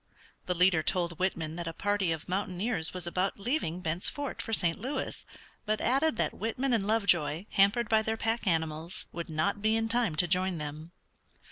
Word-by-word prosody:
The 180 - 0
leader 180 -2 +4
told 170 0 0
Whitman 165 -4 -1
that 170 -1 -4
a 165 - -3
party 205 -1 0
of 160 -2 -4
mountaineers 185 0 -1
was 180 -2 -4
about 185 +4 -1
leaving 200 - -1
Bent's 170 +1 0
Fort 285 -2 -4
for 225 - -6
St. 170 -6 +1
Louis, 265 +2 -4 0.4
but 215 0 +1
added 270 +2 +2
that - - 0
Whitman 245 +5 -1
and 205 -4 +1
Lovejoy, 185 -6 +2
hampered 205 +4 +3
by 220 0 +4
their 220 +1 -2
pack 225 0 -1
animals, 160 0 0
would 170 0 -6
not 160 +6 0
be 220 +1 +2
in 225 0 0
time 225 -7 +1
to 175 +3 +3
join 185 0 +1
them. 155 +2 -6
185 Hz, 190 wpm, -30 LUFS, 165-225 Hz, 0.4 s, leader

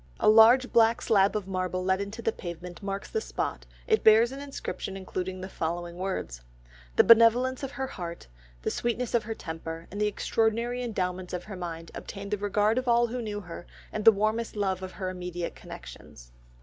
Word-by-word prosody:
A - - +2
large 225 +4 +7
black 230 0 +5
slab 200 -2 +3
of 205 -3 -2
marble 185 -1 -2
let 190 +1 +2
into 210 +4 -6
the 225 - +2
pavement 175 -2 -8
marks 195 0 -4
the 445 - 0
spot, - - -4 0.2
it 440 -2 +2
bears 225 +2 +6
an 270 - -7
inscription 275 -8 -5
including 185 -1 -4
the 190 - -5
following 170 -1 -4
words: 180 - -4 0.5
"The - - +7
benevolence 235 +3 +6
of 270 - -3
her 265 - -2
heart, 175 -9 -7 0.4
the - - 0
sweetness 240 0 -2
of 235 -3 +2
her 225 0 -4
temper, 165 -1 -7
and 205 +2 -4
the 210 - +3
extraordinary 230 +3 0
endowments 185 -6 -3
of 180 -1 -3
her 205 - -8
mind 165 -2 -6
obtained 200 0 -7
the 210 - 0
regard 205 +3 +2
of 255 - -6
all 240 0 +4
who 245 +1 -4
knew 210 -2 -4
her, 175 -1 -9 0.3
and 215 - -2
the 225 - +10
warmest 215 +3 -1
love 190 -3 -1
of 185 0 -6
her 185 -2 -4
immediate 180 -1 -5
connexions." - - -12
205 Hz, 195 wpm, -28 LUFS, 180-230 Hz, 0.5 s, the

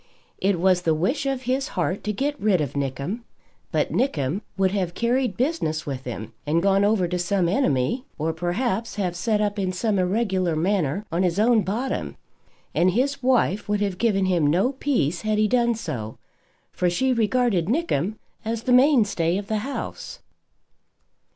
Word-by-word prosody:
It 195 -2 +1
was 185 0 +3
the 160 -2 +1
wish 250 - 0
of 270 -1 -2
his 260 +3 0
heart 180 +2 -1
to 210 - 0
get 285 +7 -2
rid 200 -4 +3
of 145 -3 -2
Nickem; 140 - -3 0.5
but - - 0
Nickem 165 - 0 0.2
would 190 -1 +2
have 185 -3 -2
carried 245 +2 0
business 240 - -1
with 135 -3 -5
him 115 -2 -6
and 165 +3 +1
gone 195 0 +3
over 205 -3 +2
to 180 +1 -2
some 180 0 +1
enemy, 175 - +1
or, 160 +2 -1
perhaps 190 +7 -2
have 185 -4 -2
set 210 +3 0
up 205 0 -1
in 185 -2 0
some 200 +2 0
irregular 185 -3 +1
manner 185 +1 0
on 170 +2 0
his 180 -1 +1
own 225 0 +4
bottom; 225 +8 -3 0.6
and 175 +2 +3
his 275 +5 0
wife 245 -6 +1
would 210 0 +1
have 195 -3 -1
given 200 -5 +2
him 175 -5 +2
no 185 - +2
peace 245 - 0
had 215 -1 0
he 215 0 +3
done 235 0 +2
so, 125 - -5 0.5
for 180 - 0
she 260 +9 +1
regarded 230 -6 +1
Nickem 220 - 0 0.3
as 225 +1 -3
the 250 - +2
mainstay 220 - +4
of 200 - -4
the 215 +1 -1
house. 275 +6 -5
200 Hz, 175 wpm, -24 LUFS, 175-235 Hz, 0.6 s, own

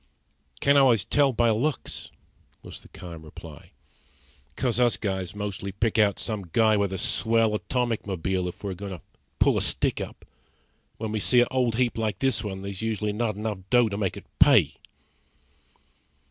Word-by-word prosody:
"Can't 140 0 +5
always 120 -8 +4
tell 145 -2 +3
by 120 -1 +2
looks," 135 +8 -1 0.5
was - - -9
the - - -15
calm 85 -3 -10
reply. 80 -1 -12 0.9
"'Course 125 -2 0
us 120 -6 +3
guys 95 -2 -3
mostly 100 -1 -4
pick 110 +3 0
out 100 -2 +3
some 105 -6 -4
guy 110 -2 +4
with 100 -2 0
a 95 - -3
swell 115 +2 +2
atomic 120 0 -1
mobile 95 0 -1
if 90 - -8
we're 100 -2 -3
goin' 100 +1 -7
to 90 - -9 0.4
pull - - +3
a - - -2
stick - - +1
up. - - -8 0.7
When 110 -1 -4
we 110 - -1
see 125 +4 +4
a 120 - +3
old 125 -3 +1
heap 120 -1 0
like 110 -4 -1
this 120 -3 +1
one 95 -2 -5
there's 100 -1 -5
usually 105 -2 -1
not 110 -1 -1
enough 105 -1 -4
dough 120 -2 +4
to 100 - -4
make 95 -3 -1
it - - -10
pay." - - +5
105 Hz, 175 wpm, -26 LUFS, 100-120 Hz, 0.9 s, Can't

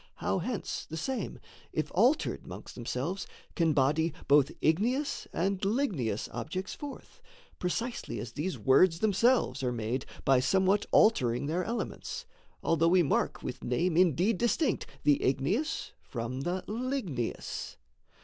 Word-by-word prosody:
how, - - -1
hence, 210 +3 -3
The 160 - -5
same, 240 +6 -3 0.3
if - - -2
altered - - +2
'mongst - - -9
themselves, 130 +10 -3 0.3
can 165 -3 +3
body 150 +3 +2
Both 140 -1 +5
igneous 240 - +1
and 195 +2 0
ligneous 195 - 0
objects 155 +11 -4
forth 290 -2 -9 0.4
Precisely 180 - -2
as 110 +1 -6
these 170 +9 -3
words 165 +5 +4
themselves 215 - +3
are 125 -2 0
made 120 +2 -2 0.2
By 135 -2 +5
somewhat 190 +9 +2
altering 125 - +4
their 170 +5 0
elements, 235 +4 -4 0.4
Although 165 0 +3
we 180 +1 +5
mark 140 - 0
with 125 - -5
name 160 +8 +1
indeed 180 - +3
distinct 245 +5 +1 0.2
The 145 -1 +4
igneous 160 - 0
from 125 +2 -4
the 180 +5 -2
ligneous. 220 - -3
170 Hz, 130 wpm, -30 LUFS, 135-205 Hz, 0.4 s, Both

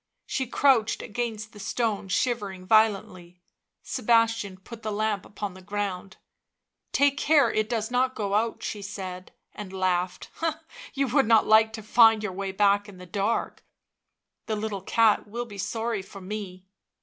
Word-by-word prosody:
She 265 -2 -2
crouched 235 -3 +2
against 220 -1 -4
the 210 - -12
stone, 205 0 -1
shivering 195 -2 -1
violently. 195 -4 +1 0.4
Sebastian 225 -3 +1
put 225 +4 -11
the 215 - -3
lamp 210 -2 -1
upon 205 -1 -5
the 185 - -13
ground. 195 -1 -4 0.4
" - - -58 0.3
Take 280 0 +3
care 290 -5 +4
it 215 0 0
does 225 -1 -2
not 255 +1 +1
go 200 -2 -2
out," 225 +2 0
she 210 - -4
said, 190 -2 -7 0.2
and 205 -3 -8
laughed. 185 -1 -1
u 330 -1 +2 0.4
You 275 0 +1
would 270 -1 +3
not 225 -1 +5
like 220 0 +5
to 220 -1 -7
find 225 0 +5
your 210 - -2
way 195 +1 -3
back 205 +1 +2
in 195 - -12
the 180 - -10
dark 200 +5 -2 0.4
— - - -58
the 220 - -1
little 210 -2 -3
cat 220 +2 +3
will 235 +3 -4
be 205 -4 -10
sorry 225 +2 -2
for 195 +1 -12
me." 190 -1 -7
210 Hz, 170 wpm, -26 LUFS, 195-230 Hz, 0.4 s, not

